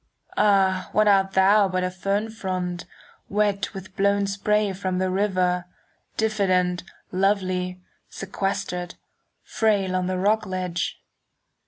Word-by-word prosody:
Ah, 190 Hz, -3 st, +3 dB
what 215 Hz, +1 st, +4 dB
art 195 Hz, -1 st, +4 dB
thou 200 Hz, +2 st, +5 dB
but 185 Hz, -1 st, -1 dB
a 180 Hz, -, -1 dB
fern 200 Hz, +4 st, -1 dB
frond, 185 Hz, -5 st, -3 dB, 0.4 s
5 -, -, -41 dB
Wet 205 Hz, -1 st, 0 dB
with 190 Hz, 0 st, -9 dB
blown 200 Hz, 0 st, +2 dB
spray 205 Hz, +1 st, +1 dB
from 185 Hz, -1 st, -2 dB
the 185 Hz, 0 st, 0 dB
river, 185 Hz, -2 st, +1 dB, 0.5 s
Diffident, 185 Hz, -5 st, +1 dB, 0.3 s
lovely, 185 Hz, -1 st, 0 dB, 0.3 s
sequestered, 195 Hz, -2 st, -3 dB, 0.5 s
Frail 200 Hz, -4 st, +1 dB
on 185 Hz, -1 st, 0 dB
the 185 Hz, 0 st, -1 dB
rock 210 Hz, +3 st, +1 dB
ledge? 180 Hz, -2 st, -3 dB
190 Hz, 125 wpm, -24 LUFS, 185-200 Hz, 0.5 s, thou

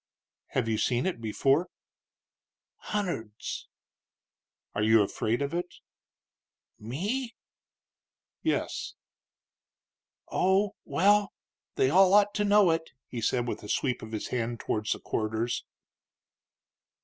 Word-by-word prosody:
"Have 125 Hz, -3 st, -1 dB
you 110 Hz, -1 st, 0 dB
seen 125 Hz, -1 st, +1 dB
it 185 Hz, -11 st, -2 dB
before?" 135 Hz, +10 st, +2 dB, 1.2 s
"Hunderds." 170 Hz, -, -3 dB, 1.1 s
"Are -, -, -1 dB
you 110 Hz, 0 st, +5 dB
afraid 115 Hz, +6 st, -1 dB
of 140 Hz, -, -3 dB
it?" 175 Hz, +1 st, -3 dB, 1.0 s
"Me?" 205 Hz, -, -3 dB, 1.1 s
"Yes." -, -, -2 dB, 1.4 s
"Oh, 190 Hz, +2 st, +2 dB
well, 205 Hz, +2 st, +3 dB, 0.4 s
they 130 Hz, -, +3 dB
all 190 Hz, +3 st, +6 dB
ought 205 Hz, 0 st, +5 dB
to 210 Hz, -, 0 dB
know 205 Hz, -3 st, +5 dB
it," 165 Hz, 0 st, -1 dB, 0.2 s
he 120 Hz, -, -5 dB
said, 120 Hz, +2 st, +1 dB
with -, -, -3 dB
a 105 Hz, -, -10 dB
sweep 125 Hz, -4 st, 0 dB
of 110 Hz, -, -8 dB
his 110 Hz, -2 st, -4 dB
hand 120 Hz, -1 st, -2 dB
towards 110 Hz, 0 st, -1 dB
the -, -, -8 dB
corridors. 110 Hz, +2 st, -2 dB
135 Hz, 115 wpm, -29 LUFS, -, 1.4 s, all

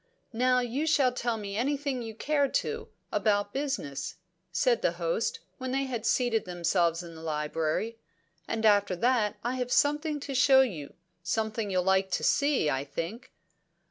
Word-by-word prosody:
"Now 250 Hz, +2 st, +3 dB
you 255 Hz, +6 st, -2 dB
shall 280 Hz, -5 st, +4 dB
tell 240 Hz, -2 st, -2 dB
me 200 Hz, -2 st, -5 dB
anything 275 Hz, +2 st, -1 dB
you 225 Hz, -2 st, -7 dB
care 285 Hz, +3 st, +1 dB
to, 450 Hz, -, -2 dB, 0.2 s
about 205 Hz, -1 st, +1 dB
business," 155 Hz, -, -3 dB, 0.4 s
said 250 Hz, -3 st, +2 dB
the 170 Hz, -, +1 dB
host, 175 Hz, -, -1 dB, 0.2 s
when 260 Hz, 0 st, -4 dB
they 270 Hz, +2 st, 0 dB
had 245 Hz, -5 st, -3 dB
seated 240 Hz, -4 st, +2 dB
themselves 175 Hz, -1 st, +1 dB
in 170 Hz, -1 st, -10 dB
the 160 Hz, -, -11 dB
library. 160 Hz, +8 st, -2 dB, 0.5 s
"And 225 Hz, 0 st, -1 dB
after 205 Hz, -3 st, +4 dB
that 230 Hz, +1 st, +2 dB
I 245 Hz, +2 st, -1 dB
have 250 Hz, -1 st, -3 dB
something 295 Hz, +2 st, +2 dB
to 275 Hz, -, -5 dB
show 265 Hz, 0 st, +6 dB
you 170 Hz, -, -3 dB, 0.3 s
something 220 Hz, +4 st, -1 dB
you'll 185 Hz, -1 st, +1 dB
like 190 Hz, +1 st, +2 dB
to -, -, 0 dB
see, 285 Hz, -, +2 dB
I 135 Hz, -2 st, 0 dB
think." 165 Hz, -, -6 dB
225 Hz, 165 wpm, -29 LUFS, 180-265 Hz, 0.5 s, show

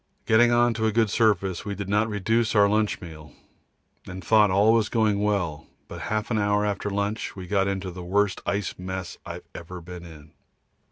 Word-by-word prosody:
Getting 120 Hz, +2 st, +5 dB
on 120 Hz, 0 st, +3 dB
to 110 Hz, -1 st, 0 dB
a -, -, +1 dB
good 110 Hz, -1 st, +2 dB
surface 100 Hz, -6 st, +1 dB
we 100 Hz, 0 st, -4 dB
did 100 Hz, -1 st, -5 dB
not 105 Hz, +3 st, +1 dB
reduce 110 Hz, +3 st, 0 dB
our 100 Hz, -1 st, +6 dB
lunch 105 Hz, 0 st, 0 dB
meal, 75 Hz, -4 st, -11 dB, 0.7 s
and 95 Hz, -1 st, -8 dB
thought 105 Hz, 0 st, +5 dB
all 105 Hz, +4 st, +4 dB
going 105 Hz, -2 st, +1 dB
well, 90 Hz, -8 st, -1 dB, 0.2 s
but -, -, -8 dB
half 110 Hz, +2 st, -2 dB
an 110 Hz, -, +1 dB
hour 105 Hz, 0 st, +1 dB
after 105 Hz, 0 st, -2 dB
lunch 100 Hz, +2 st, -3 dB
we 95 Hz, -2 st, -7 dB
got 95 Hz, +1 st, +1 dB
into 95 Hz, -1 st, -3 dB
the 90 Hz, +1 st, -8 dB
worst 100 Hz, +2 st, 0 dB
ice 100 Hz, -2 st, -2 dB
mess 95 Hz, -1 st, -6 dB
I -, -, -5 dB
have -, -, -9 dB
ever 90 Hz, +2 st, -8 dB
been 90 Hz, +1 st, -10 dB
in. 80 Hz, -3 st, -13 dB
100 Hz, 200 wpm, -25 LUFS, 90-110 Hz, 0.7 s, our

